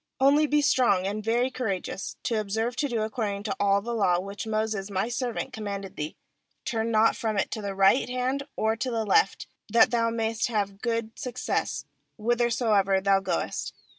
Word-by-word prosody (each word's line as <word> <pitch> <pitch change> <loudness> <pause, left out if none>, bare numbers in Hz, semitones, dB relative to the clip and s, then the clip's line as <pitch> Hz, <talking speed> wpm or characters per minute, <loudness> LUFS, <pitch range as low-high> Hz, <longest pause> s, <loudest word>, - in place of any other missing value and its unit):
70nly 285 +3 +4
be 295 0 +3
strong 220 -9 +3
and 210 +2 -2
very 240 +4 +1
courageous, 200 -7 -3
to 230 -3 0
observe 220 +4 -2
to 290 - +1
do 230 -4 -1
accord 215 -2 -2
ing 200 - -7
to 205 -2 -2
all 200 0 +3
the 235 +1 -3
law, 185 -6 +2
which 200 +3 -6
Moses 215 -2 -1
My 200 +3 -1
servant 250 +1 -3
commanded 200 -3 -5
thee; 150 +1 -4 0.5
turn 225 0 -1
not 220 0 +4
from 220 -2 -2
it 195 - 0
to 220 - -3
the 200 -1 -4
right 195 +7 +4
hand 255 +2 -1
or 220 +1 +1
to 255 +3 -2
the 225 -2 -1
left, 430 - +2 0.3
that 230 - +6
thou 230 -1 +2
mayest 225 +1 -1
have 200 -4 -2
good 230 -2 -1
success 250 -2 -2 0.3
whithersoever 225 -4 +2
thou 195 0 +3
goest. 195 - -2
220 Hz, 185 wpm, -27 LUFS, 200-240 Hz, 0.5 s, that